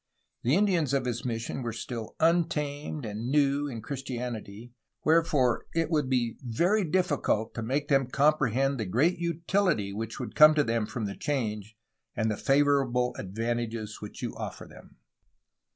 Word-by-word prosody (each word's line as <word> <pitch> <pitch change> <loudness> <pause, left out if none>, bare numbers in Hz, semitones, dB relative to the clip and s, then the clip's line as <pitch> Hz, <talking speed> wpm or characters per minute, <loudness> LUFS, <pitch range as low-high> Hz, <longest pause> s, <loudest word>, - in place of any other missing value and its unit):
'' - - -51
The 125 +6 +3
Indians 175 -9 +2
of 135 -2 0
his 120 -1 -2
mission 120 +1 -3
were 120 -2 -3
"still 115 0 -6
untamed 155 -4 0
and 110 +3 -4
new 145 0 +2
in 115 -5 -6
Christianity," 120 -4 -6 0.3
wherefore 150 -6 +3
it 165 0 0
would 150 -5 +1
be 120 -3 0
"very 170 - +1
difficult 150 - 0
to 115 - -4
make 135 +6 -1
them 135 -3 +3
comprehend 135 -2 +2
the 110 - -1
great 155 - +2
utility 170 - 0
which 110 +2 -5
would 120 -5 -5
come 155 0 +8
to 150 - +4
them 115 -3 0
from 115 0 -4
the 100 - -4
change 110 -6 -3 0.4
and 110 0 0
the - - -1
favorable 135 -3 +2
advantages 115 +2 -3
which 105 - -8
you - - -3
offer - - -6
them." - - -16
130 Hz, 160 wpm, -28 LUFS, 115-150 Hz, 0.4 s, come